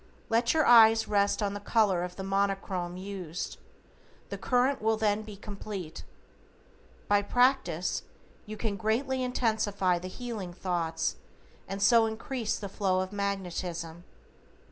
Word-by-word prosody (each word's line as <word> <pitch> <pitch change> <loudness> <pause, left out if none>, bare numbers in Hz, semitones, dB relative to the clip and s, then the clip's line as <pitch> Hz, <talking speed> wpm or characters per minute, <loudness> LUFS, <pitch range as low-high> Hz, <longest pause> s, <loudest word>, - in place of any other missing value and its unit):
Let 235 +5 +2
your 310 - +4
eyes 225 -1 +7
rest 205 +1 +2
on 200 -1 -1
the 205 - -4
color 205 -4 +2
of 180 0 -6
the 190 - -6
Monochrome 195 -2 -1
used, 185 -3 -6 0.7
the - - -4
current 255 +1 +1
will 220 0 +2
then 215 -1 +1
be 215 -1 -9
complete. 200 -4 -7 1.0
By 205 0 +4
practise 250 +6 +1 0.5
you 215 0 -6
can 210 -3 -2
greatly 255 +6 0
intensify 215 -7 +1
the 180 - -6
healing 210 -3 -6
thoughts 165 -3 -2 0.5
and 195 +1 -3
so 230 -1 +6
increase 225 +1 -3
the 205 - -5
flow 190 -1 0
of 185 0 -4
magnetism. 180 -4 -3
200 Hz, 135 wpm, -29 LUFS, 185-225 Hz, 1.0 s, eyes